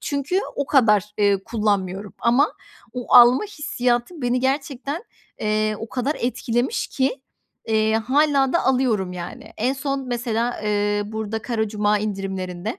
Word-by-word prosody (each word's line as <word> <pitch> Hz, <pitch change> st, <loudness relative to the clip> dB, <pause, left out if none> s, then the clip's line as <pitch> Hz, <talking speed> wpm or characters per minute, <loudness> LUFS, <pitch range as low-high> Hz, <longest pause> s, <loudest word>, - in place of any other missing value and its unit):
çünkü 290 Hz, +7 st, -1 dB, 0.2 s
o 280 Hz, -, -1 dB
kadar, 210 Hz, -8 st, +4 dB
eee, 200 Hz, -2 st, +2 dB
kullanmıyorum. 205 Hz, -3 st, -1 dB
Ama 250 Hz, +6 st, +3 dB, 0.4 s
o 250 Hz, -1 st, -2 dB
alma 245 Hz, -, +8 dB
hissiyatı 290 Hz, -, -2 dB
beni 245 Hz, +1 st, +1 dB
gerçekten, 275 Hz, -, -2 dB, 0.4 s
eee, 215 Hz, 0 st, 0 dB
o 225 Hz, -, -6 dB
kadar 260 Hz, +5 st, -1 dB
etkilemiş 240 Hz, -, -1 dB
ki, 265 Hz, 0 st, -1 dB, 0.5 s
eee, 220 Hz, 0 st, +2 dB
hâlâ 270 Hz, +4 st, +2 dB
da 345 Hz, -, +1 dB
alıyorum, 235 Hz, -8 st, +1 dB
yani. 175 Hz, -1 st, -8 dB
En 250 Hz, +5 st, +1 dB
son 275 Hz, -1 st, -3 dB
mesela, 240 Hz, -1 st, -1 dB
eee, 205 Hz, 0 st, +1 dB
burada 220 Hz, 0 st, -4 dB
Kara 220 Hz, -1 st, -1 dB
Cuma 210 Hz, 0 st, +1 dB
indirimlerinde 195 Hz, 0 st, -4 dB
235 Hz, 135 wpm, -22 LUFS, 210-265 Hz, 0.5 s, alma